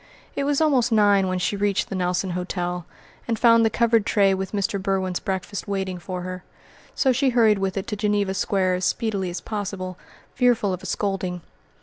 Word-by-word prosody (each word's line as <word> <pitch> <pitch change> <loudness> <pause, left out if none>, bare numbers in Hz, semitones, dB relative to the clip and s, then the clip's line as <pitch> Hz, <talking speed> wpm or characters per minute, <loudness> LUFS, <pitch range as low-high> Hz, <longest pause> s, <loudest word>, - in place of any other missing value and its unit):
It 280 - -1
was 285 -1 +1
almost 270 -6 +3
nine 205 -3 +4
when 185 0 -1
she 180 +3 -1
reached 200 -1 0
the 195 - -4
Nelson 180 0 -1
Hotel, 180 -1 -3 0.4
and 230 -2 0
found 230 0 +5
the 225 - +4
covered 230 -1 +2
tray 200 -2 +3
with 190 0 -3
Mr. 200 -1 -1
Berwin's 190 -2 -1
breakfast 190 +1 -4
waiting 190 -2 -3
for 180 +1 -5
her; 185 0 -6 0.5
so 265 - +3
she 265 +2 +2
hurried 225 -4 +4
with 195 0 -2
it 195 - -2
to 210 - -3
Geneva 205 -2 0
Square 190 -1 +1
as 180 0 -1
speedily 200 -5 -1
as 175 -1 -5
possible, 195 -4 -5 0.3
fearful 235 -6 +2
of 185 - -5
a - - -7
scolding. 190 -3 -2
195 Hz, 195 wpm, -23 LUFS, 185-220 Hz, 0.5 s, found